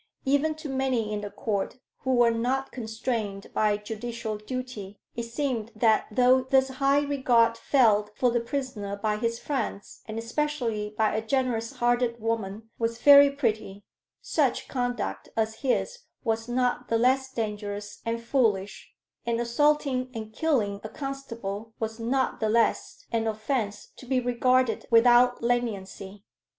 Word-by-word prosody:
Even 285 +3 +2
to 310 0 -8
many 260 -5 0
in 210 - -2
the 205 - -5
Court 200 0 -3 0.2
who 260 -1 0
were 240 -1 +5
not 255 +4 -1
constrained 220 -3 -4
by 210 -1 +2
judicial 220 +1 -5
duty, 215 -4 -6 0.2
it 235 - -2
seemed 235 -2 -2
that 220 0 +3
though 250 +3 +4
this 265 +1 +2
high 275 +2 +2
regard 245 -5 +3
felt 220 -4 +3
for 250 -2 +3
the 240 - +2
prisoner 235 -5 -4
by 210 +1 -1
his 230 +1 -1
friends, 235 -7 -4
and 215 0 -5
especially 230 -4 -2
by 220 -1 +2
a 220 - 0
generous 230 -1 -1
hearted 240 0 +1
woman, 225 -1 -3
was 230 0 -1
very 285 +2 +8
pretty, 215 -7 -2 0.4
such - - 0
conduct 245 -2 -3
as 220 0 0
his 485 - 0 0.2
was 225 -1 -1
not 250 0 0
the 230 - +2
less 265 +3 +2
dangerous 205 -3 -4
and 230 0 -3
foolish, 215 -6 0 0.3
and 235 0 +1
assaulting 260 +1 +1
and 220 -1 -6
killing 215 -10 0
a 215 - -5
constable 230 -7 -6
was 220 0 -4
not 255 +3 0
the 220 - 0
less 230 +1 +1
an 225 -1 0
offence 215 -1 -2
to 255 - -12
be 260 0 +2
regarded 250 0 +1
without 245 +1 +5
leniency. 205 -4 -2
230 Hz, 145 wpm, -27 LUFS, 215-255 Hz, 0.4 s, very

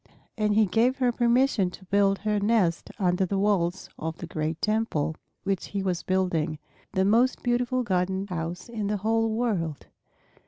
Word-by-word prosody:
And 210 -2 +1
he 220 0 +5
gave 235 +7 +2
her 250 -2 +2
permission 240 -4 +2
to 190 +1 -13
build 195 +1 +3
her 210 0 0
nest 200 -5 +1
under 180 -2 +1
the 195 +1 -1
walls 190 -3 +1
of 160 +1 -4
the - - -6
great 160 0 -3
Temple 215 -8 0 0.3
which 195 -2 -1
he 200 -1 -3
was 180 -2 -1
building, 175 -4 0 0.4
the 190 0 +2
most 235 +6 +3
beautiful, 245 +1 +1
golden 190 -2 0
house 175 -1 -5
in 220 -4 -3
the 210 0 0
whole 225 +3 +1
world. 210 - -1
200 Hz, 165 wpm, -26 LUFS, 180-225 Hz, 0.4 s, he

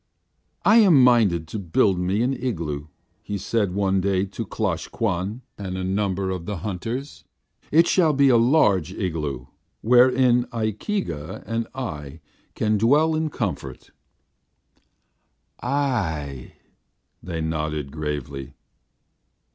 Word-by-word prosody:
"I 215 - +6
am 180 - +6
minded 105 -10 +4
to 110 - -4
build 95 +1 +2
me 95 +5 0
an 130 +2 +1
igloo," 85 - -3 0.3
he 105 - -4
said 100 -2 -1
one 95 -1 +1
day 95 0 +1
to 95 - -6
Klosh - - -2
Kwan 105 +3 -2 0.2
and 95 -2 -4
a 95 - -3
number 95 0 -1
of 90 -3 -5
the 105 - -3
hunters. 105 - -5 0.5
"It 165 +3 +6
shall 170 -3 +3
be 140 -1 +4
a 125 - +5
large 115 - +3
igloo, 75 - -3 0.4
wherein 125 +1 +4
Ikeega 110 - -3
and 115 +2 -2
I 80 - -6 0.4
can 105 -1 +1
dwell 150 +8 +4
in 155 0 0
comfort." 90 - -5 1.7
"Ay," 95 - -2 0.7
they 85 -1 -5
nodded 75 -3 -3
gravely. 70 -3 -5
100 Hz, 120 wpm, -23 LUFS, 80-125 Hz, 1.7 s, I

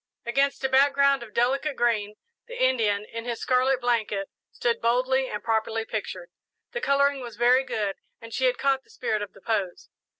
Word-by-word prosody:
Against 275 +4 +1
a - - +3
background 275 +1 +4
of 235 -2 -10
delicate 270 +6 0
green, 215 -3 0 0.3
the - - -8
Indian, 215 -5 +2
in 230 0 -5
his 240 -1 -3
scarlet 255 +1 +2
blanket, 220 -5 -1 0.2
stood 235 -1 -1
boldly 255 +3 +2
and 210 - -5
properly 225 0 0
pictured. 185 -6 -5 0.4
The 480 0 -4
colouring 280 - +2
was 235 -3 -8
very 245 +3 +4
good 210 -6 -2 0.2
and 230 0 -11
she 260 - 0
had 250 -1 +2
caught 270 -1 +1
the - - -30
spirit 215 -4 -2
of 205 - -6
the 195 - -17
pose. 200 -5 -2
240 Hz, 180 wpm, -26 LUFS, 220-265 Hz, 0.4 s, background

